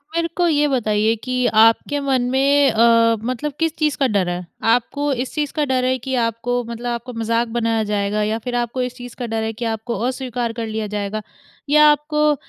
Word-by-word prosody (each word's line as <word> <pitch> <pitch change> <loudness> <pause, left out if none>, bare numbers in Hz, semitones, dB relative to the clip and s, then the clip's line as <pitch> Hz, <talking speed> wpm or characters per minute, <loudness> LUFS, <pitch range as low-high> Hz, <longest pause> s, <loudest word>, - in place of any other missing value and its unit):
मेरे 335 0 +1
को 350 -1 +3
ये 295 -2 +2
बताइए 220 -4 +1
कि 255 -1 -1
आपके 225 +6 +3
मन 270 -2 +1
में 275 +1 +3
अ, 230 0 +4
मतलब 255 +5 -3
किस 325 -1 0
चीज़ 305 -2 0
का 270 - +2
डर 200 -6 0
है? 175 0 -4 0.2
आपको 245 +5 +1
इस 250 0 -4
चीज़ 295 -2 -2
का 300 -2 0
डर 260 -2 0
है 260 0 +1
कि 265 +2 -3
आपको 235 +2 -1
मतलब 235 +1 -6
आपको 240 +1 -5
मज़ाक 230 +1 0
बनाया 225 -1 +1
जाएगा 210 0 -1
या 215 +1 0
फिर 245 +2 -4
आपको 240 +1 -1
इस 250 0 -3
चीज़ 245 -1 -10
का 245 - -2
डर 225 -1 -2
है 220 0 -2
कि 235 +2 -5
आपको 225 +1 -3
अस्वीकार 250 -3 -3
कर 230 -1 -4
लिया 220 -1 -3
जाएगा 205 +1 -3 0.5
या 300 +1 +6
आपको 300 0 +1
240 Hz, 210 wpm, -20 LUFS, 225-270 Hz, 0.5 s, या